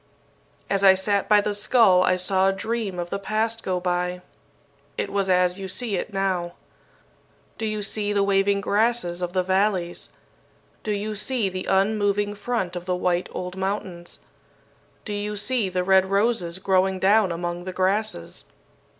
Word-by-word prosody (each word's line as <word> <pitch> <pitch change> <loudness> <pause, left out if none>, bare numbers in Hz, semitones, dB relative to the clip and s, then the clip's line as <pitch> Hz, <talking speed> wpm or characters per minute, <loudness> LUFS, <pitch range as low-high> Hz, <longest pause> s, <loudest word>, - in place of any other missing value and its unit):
"As 195 0 0
I 190 -1 +8
sat 200 +1 0
by 210 -1 +6
the 210 0 -2
skull 205 -3 +4
I 185 0 +3
saw 190 +1 +2
a - - +1
dream 220 -1 -3
of 175 0 -4
the 200 - -2
past 220 +3 -1
go 185 -3 -1
by. 180 0 -2 0.7
It - - -2
was 195 -1 0
as 180 0 +2
you 190 - -5
see 210 +2 -3
it 185 - -3
now. 185 -3 -1 1.1
"Do 220 - -1
you 215 -1 -2
see 205 0 -2
the 200 -1 +2
waving 200 0 +2
grasses 205 -4 0
of 175 0 -3
the 185 -1 +1
valleys? 190 -2 0 0.7
Do - - -6
you 210 +1 -2
see 210 0 -1
the 185 0 -5
unmoving 205 +1 +1
front 205 -4 -3
of 175 0 -5
the 180 0 0
white 180 0 0
old 180 0 -5
mountains? 190 -3 -4 0.9
Do 210 - -4
you 205 +1 -3
see 210 0 -1
the 180 0 -1
red 190 0 +4
roses 195 -3 0
growing 190 0 +1
down 195 +1 +3
among 175 +1 -4
the 185 - -4
grasses? 190 - -1
195 Hz, 165 wpm, -24 LUFS, 180-210 Hz, 1.1 s, I